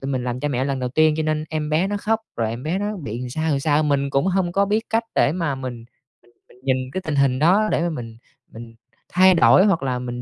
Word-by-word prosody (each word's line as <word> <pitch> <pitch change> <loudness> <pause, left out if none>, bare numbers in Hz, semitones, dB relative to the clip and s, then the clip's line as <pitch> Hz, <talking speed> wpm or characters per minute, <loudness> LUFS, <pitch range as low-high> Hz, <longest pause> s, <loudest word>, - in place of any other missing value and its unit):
tụi 135 - -4
mình 130 -2 -2
làm 125 0 -3
cha 145 - -1
mẹ 130 -1 -1
lần 135 -1 -2
đầu 125 - -2
tiên, 155 +4 +3
cho 160 - -1
nên 155 0 -1
em 155 -1 -3
bé 160 +5 +2
nó 205 +1 -2
khóc, 220 +2 -1 0.2
rồi 115 -2 -1
em 120 +3 -6
bé 165 +5 -2
nó 205 +1 -3
bị 120 - -6
làm 125 - -5
sao, 160 +4 -2
làm 140 -2 0
sao, 150 +1 +2
mình 140 -2 0
cũng 135 +6 +1
hông 185 -2 0
có 200 +2 +2
biết 215 +3 0
cách 225 +1 +1
để 145 - +3
mà 165 -5 -2
mình 125 -3 -7 0.7
mình - - -20
mình - - -24
nhìn 130 -1 -1
cái 190 - -3
tình 155 -4 -3
hình 135 -2 +2
đó 190 +8 +4
để - - +1
mà 175 - 0
mình 115 -7 -7 0.3
mình 115 0 -11 0.3
thay 185 +1 +5
đổi 185 +3 +5
hoặc 190 -9 +1
là 130 -2 -1
mình 125 0 -5
150 Hz, 280 wpm, -21 LUFS, 130-175 Hz, 0.7 s, thay